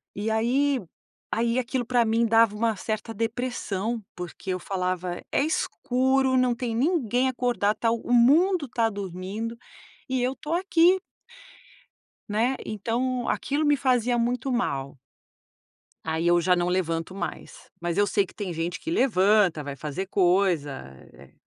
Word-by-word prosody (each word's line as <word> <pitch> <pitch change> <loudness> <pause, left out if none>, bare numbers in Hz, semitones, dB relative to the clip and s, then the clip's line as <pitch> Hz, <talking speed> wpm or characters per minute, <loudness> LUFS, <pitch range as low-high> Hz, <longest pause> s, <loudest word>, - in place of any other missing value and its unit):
e 210 +2 -2
aí 260 +5 +2 0.5
aí 230 +1 +1
aquilo 250 0 -2
pra 245 0 +3
mim 225 +1 +2
dava 225 -2 +4
uma 225 0 0
certa 215 +2 -4
depressão. 230 -1 -2
Porque 180 +1 -8
eu 185 - -2
falava: 180 -2 -3
"É - - +2
escuro, 265 -3 +1
não 255 -1 +3
tem 235 -2 -3
ninguém 255 - +1
acordado, 240 -5 0
tá 230 - +1
o 230 +1 -3
mundo 295 +7 +4
tá 230 -2 +1
dormindo 200 +3 -5 0.5
e 260 -1 0
eu 255 +2 0
tô 310 +2 -5
aqui". 365 0 +3 1.3
Né? 230 +6 +1
Então 240 +4 -2
aquilo 295 +2 0
me 295 0 +4
fazia 250 -3 +1
muito 245 +2 -1
mal. 140 - -2 1.1
Aí 160 +1 -1
eu 175 0 +4
já 180 +1 +3
não 175 0 0
levanto 170 -1 -1
mais. 190 -3 -7
Mas 175 0 -2
eu 205 0 +3
sei 200 -1 +2
que - - -17
tem 200 -4 -5
gente 170 +2 -3
que - - -6
levanta, 205 - +3
vai 140 -1 -6
fazer 155 +7 -5
coisa, 180 -5 +2 0.4
eh, - - -17
225 Hz, 150 wpm, -26 LUFS, 185-255 Hz, 1.3 s, dava